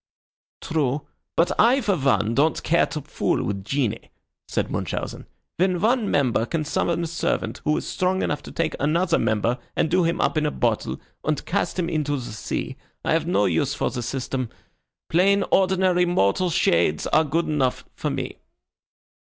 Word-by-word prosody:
"True; 145 -3 -1 0.3
but 170 +1 +3
I, 240 +5 +5
for 210 -6 +1
one, 115 - +2
don't 150 +5 +2
care 170 - +3
to 155 -2 -5
fool - - -1
with 100 -1 -3
genii," 115 -1 -2 0.4
said - - -2
Munchausen. - - -4 0.3
"When 180 0 +2
one 225 +1 +2
member 125 -5 +2
can 160 -2 -2
summon 170 +3 0
a - - -1
servant 165 +1 -2
who 150 - +2
is - - -4
strong 185 +1 0
enough 150 - -1
to - - -10
take 165 -1 -1
another 170 +4 +2
member 115 +2 +1 0.2
and 160 - +1
do 180 +1 +4
him 170 +1 0
up 155 - +2
in 150 - 0
a - - +2
bottle 115 -6 -1 0.2
and 155 -1 -1
cast 200 +1 -1
him 175 -2 0
into 150 -3 0
the 120 -4 -5
sea, 105 - -4 0.3
I - - +2
have - - +1
no 100 +1 +2
use 85 -4 +1
for - - -1
the 120 - -4
system. 130 0 -3 0.6
Plain 195 +4 +3
ordinary 185 -1 +3
mortal 175 - +2
shades 85 - +2
are 155 - +3
good 160 +3 0
enough 135 -5 0
for - - -3
me." - - -4
155 Hz, 175 wpm, -24 LUFS, 125-175 Hz, 0.6 s, I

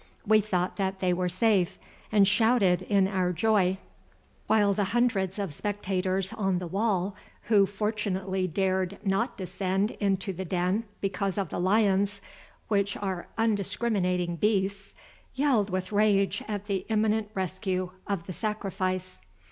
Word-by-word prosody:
We 215 0 +5
thought 185 -3 -1
that 190 -1 -1
they 185 -1 +2
were 180 0 0
safe, 190 -1 +2 0.3
and 205 -2 +5
shouted 205 -3 +3
in 200 -2 +2
our 185 -2 0
joy, 190 0 +2 0.7
while 205 -2 +4
the 200 0 0
hundreds 210 -6 +1
of 195 -7 -3
spectators 195 +1 -2
on 195 -5 0
the 180 - -4
wall 195 +1 0 0.3
who 200 -3 +5
fortunately 195 -2 -2
dared 190 +1 0
not 200 +6 0
descend 190 +2 -1
into 195 -1 0
the 185 +2 -5
den 185 +5 0 0.2
because 195 0 -1
of 195 -5 -1
the - - -4
lions, 200 +1 +2 0.5
which 200 -1 +1
are 190 -3 -4
undiscriminating 195 -5 0
beasts, 195 0 0 0.4
yelled 260 -7 +2
with 185 +1 -3
rage 200 -2 +2
at 205 -2 -4
the 195 -3 -1
imminent 215 -1 +1
rescue 185 0 -2 0.2
of 195 -5 -2
the 185 - -6
sacrifice. 190 -3 -3
195 Hz, 140 wpm, -28 LUFS, 185-210 Hz, 0.7 s, We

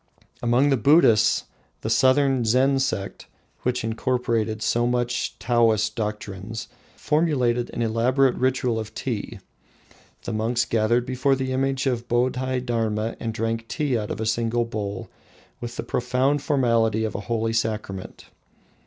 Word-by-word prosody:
Among 120 +4 +3
the 135 - +3
Buddhists, 130 -4 +4 0.4
the 110 - -3
southern 130 +1 +3
Zen 130 +4 +3
sect, 100 -7 -3 0.3
which 125 -1 -1
incorporated 115 -2 -1
so 120 +1 +1
much 120 0 -1
of - - -34
Taoist 115 -3 +2
doctrines, 105 0 -5 0.3
formulated 135 -6 +1
an 120 - -3
elaborate 125 +4 +2
ritual 125 -3 0
of 110 0 -7
tea. 115 -6 -4 0.9
The 115 - -4
monks 115 +3 0
gathered 115 +2 +1
before 130 +2 +1
the 130 0 -3
image 135 +1 0
of 120 -3 -1
Bodhi 125 +1 0
Dharma 115 -2 -1
and 115 - -3
drank 115 +1 -2
tea 145 -3 -1
out 105 -2 -2
of - - -4
a 110 - -2
single 115 +1 0
bowl 105 -4 -5 0.5
with 120 0 -6
the - - -4
profound 130 +4 0
formality 115 -6 +2
of 110 - -3
a - - -3
holy 115 -1 0
sacrament. 105 -4 -3
120 Hz, 145 wpm, -24 LUFS, 110-130 Hz, 0.9 s, Buddhists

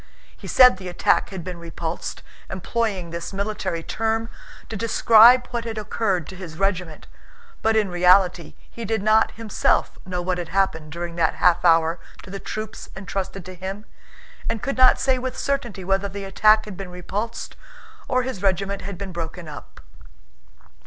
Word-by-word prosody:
He - - -11
said 250 -6 +7
the 185 -1 -8
attack 175 - +2
had 190 -3 -6
been 180 -1 -6
repulsed, 165 0 -5 0.3
employing 190 -2 -2
this 170 0 -5
military 200 -4 -3
term 225 +3 -1 0.4
to 225 - -6
describe 230 +3 +6
what 235 -1 -2
had 225 -1 -5
occurred 200 -5 -1
to 190 - -10
his 175 -4 -9
regiment, 180 -4 -2 0.6
but 225 0 +2
in 215 -2 +3
reality 180 -1 +3
he 235 - -9
did 220 -1 -1
not 215 +1 +4
himself 225 -2 0
know 180 -1 -4
what 180 0 -1
had 170 -2 -5
happened 160 -6 0
during 170 +1 -5
that 165 -1 +2
half 175 -1 +3
hour 165 0 +4 0.2
to 185 - -11
the 195 - -5
troops 215 +2 -6
entrusted 195 -1 -5
to 185 - -8
him, 190 +3 -6 0.6
and 230 -2 -3
could 275 - -1
not 255 0 +6
say 260 -1 +2
with 255 0 -4
certainty 240 -9 -2
whether 195 +2 0
the 200 0 -6
attack 215 +3 +4
had 210 -3 -8
been 195 0 -7
repulsed 195 +5 -5 0.5
or 255 -1 +1
his 245 -7 -5
regiment 195 0 0
had 200 -1 -6
been 195 0 -6
broken 170 0 -6
up. 150 - -11
195 Hz, 170 wpm, -23 LUFS, 175-220 Hz, 0.6 s, said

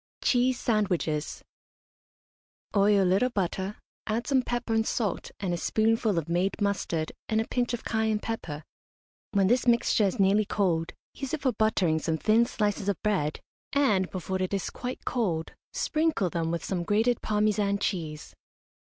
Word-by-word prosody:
CHEESE 250 0 +2
SANDWICHES. 180 -9 -1 1.3
Oil 200 0 +5
a - - +2
little 195 +8 +3
butter, 195 -1 -2 0.3
add 225 +2 -1
some 270 -2 +3
pepper 240 -1 -2
and 225 0 +2
salt, 210 -6 -1
and 190 -3 -1
a - - -1
spoonful 220 +2 +1
of 165 - -1
made 175 +3 0
mustard 190 -6 -1 0.2
and 220 - +2
a 225 - -1
pinch 245 -1 0
of 235 - -10
cayenne 220 -1 +1
pepper. 170 -9 -5 0.7
When 200 -2 +3
this 245 +5 +2
mixture 235 -2 +3
is 200 +4 -1
nearly 200 +2 +4
cold, 175 -5 0 0.2
use 275 +2 -3
it 305 - -10
for 260 - +3
buttering 200 -8 +2
some 160 0 -1
thin 225 +6 +3
slices 205 -3 -1
of 200 - -1
bread, 185 -8 0 0.3
and, 210 -10 +3
before 185 0 -3
it 185 +2 0
is 195 - -3
quite 250 +1 -6
cold, 180 -10 -1 0.2
sprinkle 310 - 0
them 165 -2 -1
with 170 -1 -2
some 185 -3 -1
grated 220 +6 +2
Parmesan 210 -1 +1
cheese. 160 -7 -3
205 Hz, 160 wpm, -28 LUFS, 180-225 Hz, 1.3 s, Oil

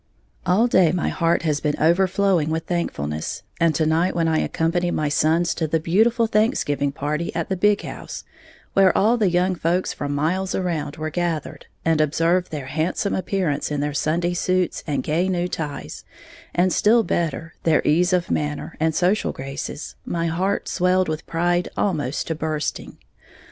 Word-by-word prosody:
_ - - -45 0.5
All 210 +6 +4
day 185 -9 +4
my 180 -1 0
heart 170 -1 +1
has 150 -3 +1
been 150 -1 -1
overflowing 180 0 +2
with 160 +1 -2
thankfulness; 80 - -3 0.2
and 165 -1 +3
to 160 - +2
night 165 +4 +1
when 165 -1 +1
I 160 -1 +2
accompanied 175 +2 0
my 150 -1 0
sons 160 +4 +2
to 160 - -2
the 160 +1 +1
beautiful 225 +9 +3
Thanksgiving 210 - +1
party 150 +4 -2
at 165 -1 -2
the 190 - 0
big 205 +2 +2
house, - - -7 0.5
where 195 -1 +4
all 220 +4 +4
the 215 -5 +2
young 180 +2 +2
folks 175 +1 0
from 145 0 -3
miles 185 +6 0
around 160 -6 -2
were 155 0 -4
gathered, 170 -3 -3 0.2
and 165 -1 +3
observed 165 +4 +1
their 145 -4 -5
handsome 160 +8 -1
appearance 185 -6 -1
in 150 -1 -2
their 145 0 -1
Sunday 170 +4 0
suits 185 0 0
and 140 -4 -1
gay 170 +5 0
new 180 -1 0
ties, 150 -5 -5 0.5
and, 180 +1 +3
still 225 +2 +4
better, 165 -3 -2
their 160 -2 +2
ease 175 +4 +3
of 180 -2 0
manner, 150 -1 -2
and 160 0 +1
social 185 +4 +1
graces, 135 +3 -6
my 170 -1 -2
heart 180 +5 -1
swelled 180 0 +2
with 155 0 -4
pride 175 +1 0
almost 150 -9 -1
to 165 - -2
bursting. 155 -1 -3
170 Hz, 175 wpm, -22 LUFS, 155-185 Hz, 0.5 s, All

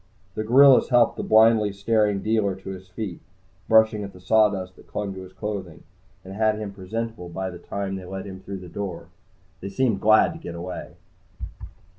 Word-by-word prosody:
The 110 - -3
gorillas 130 +4 +6
helped 120 -2 +4
the - - -2
blindly 110 -1 +4
staring 105 0 +1
dealer 105 -3 +1
to 95 0 -10
his 95 0 -9
feet, 90 -2 -6 0.5
brushing 110 -1 +4
at 100 -1 -8
the 90 - -14
sawdust 95 -1 +2
that - - -18
clung 100 -2 -4
to 95 - -8
his 95 0 -11
clothing, 95 -5 -6 0.4
and 95 - -8
had 110 +1 +1
him 105 -2 -6
presentable 105 0 -5
by 95 +2 -4
the 90 - -10
time 100 -1 -4
they 95 - -9
led 95 +2 -6
him 95 -1 -8
through 95 0 -7
the 90 - -10
door. 100 +2 -6 0.5
They 100 - -6
seemed 110 0 0
glad 110 0 +5
to 165 - -10
get 85 - -8
away. 90 +2 -7
100 Hz, 190 wpm, -24 LUFS, 95-110 Hz, 0.5 s, gorillas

